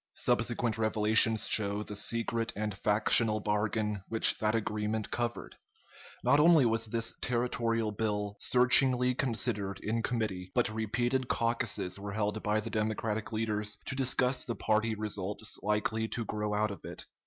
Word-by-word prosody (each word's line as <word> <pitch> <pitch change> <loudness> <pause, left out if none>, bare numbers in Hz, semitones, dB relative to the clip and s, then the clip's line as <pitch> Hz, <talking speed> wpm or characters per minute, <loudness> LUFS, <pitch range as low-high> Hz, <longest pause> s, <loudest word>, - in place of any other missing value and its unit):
Subsequent 115 0 0
revelations 110 0 +3
show 105 -1 +1
the 105 - -8
secret 115 +2 -1
and 105 0 -3
factional 110 +2 +3
bargain 105 0 -1
which 110 -1 +5
that 110 +1 0
agreement 110 0 -2
covered. 120 -1 -4 0.7
Not 145 - +4
only 160 -3 +6
was 115 0 0
this 115 +1 -2
territorial 115 -2 -1
bill 105 -1 -2
searchingly 125 0 +4
considered 110 -6 -1
in 115 +2 -2
committee, 110 -7 -3
but 120 -1 +2
repeated 120 +4 -1
caucuses 115 -5 -1
were 100 0 -6
held 105 0 -2
by 105 +1 0
the 115 +1 -7
Democratic 110 0 -2
leaders 105 -2 -2
to - - -4
discuss 130 0 +1
the 115 - -4
party 110 +1 0
results 105 0 -3
likely 105 +2 -1
to 115 0 -4
grow 105 0 -3
out 105 0 0
of 100 - -10
it. - - -8
110 Hz, 145 wpm, -30 LUFS, 105-115 Hz, 0.7 s, only